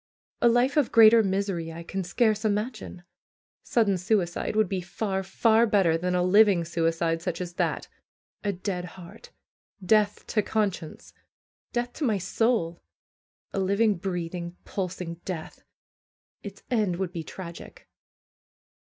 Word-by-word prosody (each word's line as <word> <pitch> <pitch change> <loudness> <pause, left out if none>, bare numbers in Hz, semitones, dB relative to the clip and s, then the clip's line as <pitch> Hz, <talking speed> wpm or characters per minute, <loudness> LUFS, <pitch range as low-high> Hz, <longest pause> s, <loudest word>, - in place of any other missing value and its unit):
A - - +5
life 245 +5 +2
of 290 -5 +2
greater 225 0 +8
misery 190 -4 -1
I 165 +1 -8
can 190 +3 -4
scarce 215 +3 +1
imagine. 215 -3 -3 0.6
Sudden 205 -6 +1
suicide 180 -1 0
would 215 -2 +3
be 185 0 -2
far, 190 +2 -3
far 225 +4 +3
better 190 -6 +3
than 180 +2 -1
a 180 - +2
living 195 -2 +5
suicide 165 0 0
such 175 -1 -3
as 175 -1 -5
that. - - -1 0.6
A 205 - +1
dead 180 -1 -4
heart! 185 - -12 0.6
Death 210 +1 +2
to 215 - +1
conscience! 195 -7 -3 0.6
Death 240 0 -2
to 310 - -5
my 220 -7 +2
soul! 185 -2 0 0.7
A - - -1
living, 200 +3 +2
breathing, 175 -1 -4
pulsing 180 -3 -5
death! 170 -4 -6 0.8
Its 200 -1 -10
end 210 -7 +1
would 185 -1 -3
be 170 -3 -5
tragic. 170 +1 -10
190 Hz, 135 wpm, -26 LUFS, 175-215 Hz, 0.8 s, greater